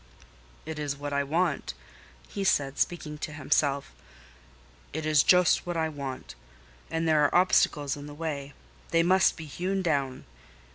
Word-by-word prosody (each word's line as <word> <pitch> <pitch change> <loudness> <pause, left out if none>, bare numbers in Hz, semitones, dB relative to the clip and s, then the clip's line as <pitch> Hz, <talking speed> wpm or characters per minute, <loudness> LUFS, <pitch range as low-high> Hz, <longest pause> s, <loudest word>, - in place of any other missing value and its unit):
"It 160 -1 -5
is 145 -2 -2
what 145 0 -5
I 140 0 +1
want," 160 +2 -1 0.5
he 200 - -4
said, 140 -7 +1
speaking 150 -3 -2
to 150 - -5
himself; 140 -1 0 1.0
"it 160 +1 -3
is 155 -2 +5
just 180 0 +4
what 175 -1 -2
I 160 -1 0
want. 140 -4 -6 0.6
And 165 0 -1
there 155 -2 +4
are 145 - +2
obstacles 150 -5 +3
in 145 0 -9
the 145 - -9
way: 145 -3 -4 0.4
they 165 0 +3
must 185 +2 +4
be 160 - -7
hewn 185 +6 -2
down. 140 -6 -1
150 Hz, 155 wpm, -28 LUFS, 140-165 Hz, 1.0 s, is